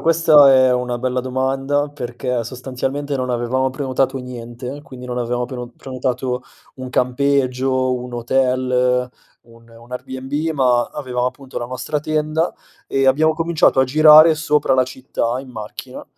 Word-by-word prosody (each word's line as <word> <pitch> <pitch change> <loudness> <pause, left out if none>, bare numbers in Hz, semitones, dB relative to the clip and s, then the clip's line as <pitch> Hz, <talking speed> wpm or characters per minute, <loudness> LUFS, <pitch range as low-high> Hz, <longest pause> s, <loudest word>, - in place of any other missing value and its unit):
questa 160 -4 +6
è 130 -1 +5
una 125 -1 -1
bella 125 +1 -1
domanda 135 +3 -1
perché 125 -3 -3
sostanzialmente 130 +3 -4
non 130 -1 -2
avevamo 125 +2 0
prenotato 130 0 -1
niente, 125 +1 -7
quindi 130 -3 -11
non 125 0 -4
avevamo 120 0 -1
preno 125 -1 -6
prenotato 130 -1 -3 0.3
un 130 -1 -7
campeggio, 130 0 +1
un 125 0 -6
hotel, 125 0 +1 0.3
un 115 0 -20
un 115 +2 -16
Airbnb 130 +5 -4
ma 125 -3 +3
avevamo, 125 -4 -2
appunto, 135 +1 -6
la 120 - -5
nostra 130 +4 -3
tenda 155 +2 -1 0.3
e 135 0 0
abbiamo 155 +4 +3
cominciato 165 -4 +2
a 130 - +4
girare 155 +3 +7
sopra 150 -3 +1
la 130 -1 +4
città 130 -2 -3
in 135 - -12
macchina, 110 -3 -8
130 Hz, 145 wpm, -19 LUFS, 125-140 Hz, 0.3 s, girare